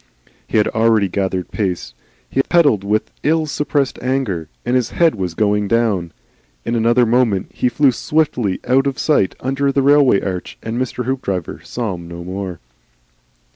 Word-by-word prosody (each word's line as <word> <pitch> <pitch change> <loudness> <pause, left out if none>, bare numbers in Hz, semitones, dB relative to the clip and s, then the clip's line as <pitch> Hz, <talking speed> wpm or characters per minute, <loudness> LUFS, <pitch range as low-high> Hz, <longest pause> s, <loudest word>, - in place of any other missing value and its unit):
He - - 0
had 105 - +3
already 110 -2 +3
gathered 95 -1 -2
pace. 90 - -3 0.3
He 135 - +1
pedalled 145 - +3
with 105 +2 -1
ill 160 +1 +2
suppressed 145 -2 -1
anger, 120 - -1 0.2
and 120 +1 +1
his 125 -2 +1
head 170 -2 +3
was 90 -5 -4
going 105 0 +1
down. 100 -6 +1 0.5
In - - -1
another 120 +1 +3
moment 115 -5 +1
he 125 - +1
flew 140 +1 +3
swiftly 125 -7 0
out 135 +2 +3
of 135 - -2
sight 145 - +1
under 135 +2 0
the 135 0 +1
railway 140 -6 +5
arch, 90 -3 -5
and 115 +2 -3
Mr. 125 -1 -3
Hoopdriver 100 -10 -3
saw 115 -5 -3
him 85 -1 -8
no 85 0 -8
more. 95 -1 -5
115 Hz, 165 wpm, -18 LUFS, 95-135 Hz, 0.5 s, railway